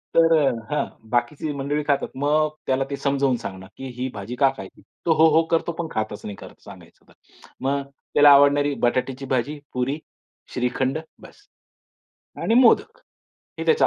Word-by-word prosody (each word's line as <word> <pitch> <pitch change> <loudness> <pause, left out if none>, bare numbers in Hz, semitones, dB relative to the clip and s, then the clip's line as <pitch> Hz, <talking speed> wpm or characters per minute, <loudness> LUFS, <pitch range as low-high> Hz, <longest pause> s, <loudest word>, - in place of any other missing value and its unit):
तर 165 0 +6
अ, 135 - +3 0.2
हां 150 - +1 0.3
बाकीची 125 +5 -1
मंडळी 140 +2 -2
खातात. 140 -1 +1
मग 150 +3 +2 0.2
त्याला 130 0 +1
ते - - -1
समजावून 140 -2 +1
सांगणं 95 -2 -8
की 135 - -7
ही 130 +1 -2
भाजी 105 +4 -6
का 135 +1 +4
खायची? 95 - -10 0.2
तो, 165 - +4
"हो 160 +1 +5
हो" 165 - +5
करतो, 165 +1 +1
पण 170 - -2
खातच 110 -1 -3
नाही 105 -1 -6
खरं - - -11
सांगायचं - - -15
तर. - - -20 0.5
मग 140 +2 0 0.3
त्याला 145 0 +7
आवडणारी 145 +1 +5
बटाट्याची 130 +2 -1
भाजी, 145 +5 -2
पुरी, 130 +4 -1 0.5
श्रीखंड 130 +3 -1 0.2
बस्स. 410 - -16 1.0
आणि 225 - +2
मोदक 260 - +4 0.6
हे - - -3
त्याचं 470 -1 +4
140 Hz, 165 wpm, -23 LUFS, 125-150 Hz, 1.0 s, त्याला